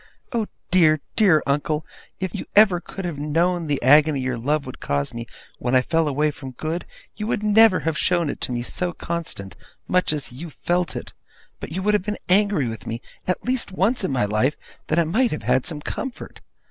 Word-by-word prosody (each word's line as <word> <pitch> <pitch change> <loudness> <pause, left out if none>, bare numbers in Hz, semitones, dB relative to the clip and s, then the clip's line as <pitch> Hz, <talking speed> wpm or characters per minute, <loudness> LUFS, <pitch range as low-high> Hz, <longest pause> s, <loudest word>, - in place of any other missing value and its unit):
Oh 225 -3 0 0.2
dear, 160 -4 +5 0.2
dear 185 -9 +5
uncle, 150 +2 0 0.3
if 185 -2 -3
you - - -5
ever 200 -4 +6
could 190 +1 -7
have 165 -5 -4
known 165 +3 +1
the 145 -2 0
agony 145 +2 +6
your 130 -1 -1
love 140 +5 0
would 130 - -8
cause 70 0 -2
me 115 0 -6 0.3
when 125 +1 0
I 130 - +5
fell 165 +3 +1
away 150 +2 +1
from 135 -3 -9
good, 160 +6 -3 0.3
you 210 - -4
never 210 -1 +6
would - - -6
have 160 -1 0
shown 175 -3 +2
it - - -4
to - - -3
me 120 -1 -2
so 175 +7 -2
constant, 165 - -5 0.3
much 180 -3 +2
as 150 -4 -4
you 155 +7 -8
felt 175 +5 -1
it; - - -6 0.5
but - - -7
would 205 +3 +1
have 210 - +3
been 210 +2 -3
angry 185 - +3
to 105 - -15
me, 115 +1 -3 0.3
at 180 - -1
least 250 -4 -1
once 200 +5 +2
in - - 0
my 125 -6 +1
life, 110 +8 +1 0.3
that 155 - 0
I 170 - +5
might 225 +10 +2
have 155 - -4
had 130 - +2
some 155 -4 -4
comfort! 265 - -6
160 Hz, 210 wpm, -23 LUFS, 135-185 Hz, 0.5 s, ever